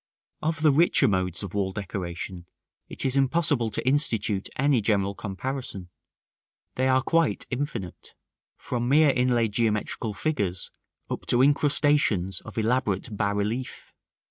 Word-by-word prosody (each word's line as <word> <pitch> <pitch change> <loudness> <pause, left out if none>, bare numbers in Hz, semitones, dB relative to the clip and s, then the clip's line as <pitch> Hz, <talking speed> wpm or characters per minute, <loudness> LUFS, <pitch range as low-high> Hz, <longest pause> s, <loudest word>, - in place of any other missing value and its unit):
§ - - -73 0.4
VII. - - 0
Of 160 -1 -4
the 155 - +6
richer 150 -1 +4
modes 95 -3 -1
of 100 - -7
wall 100 -2 -1
decoration 90 -3 -6 0.4
it - - -2
is 130 0 +1
impossible 135 -3 +2
to 110 - -4
institute 115 -9 +1
any 135 -3 +2
general 100 -2 +1
comparison; 100 -2 -5 0.8
they 130 +1 0
are 130 0 +3
quite 165 +2 +1
infinite, 125 - -5 0.4
from 120 -1 -3
mere 150 +1 +5
inlaid 120 -4 +1
geometrical 110 -1 -1
figures 100 - -1 0.4
up - - -6
to 120 +1 +4
incrustations 145 - +2
of - - -11
elaborate 110 -2 0
bas 100 0 0
relief. 110 +5 -4
115 Hz, 140 wpm, -26 LUFS, 100-135 Hz, 0.8 s, the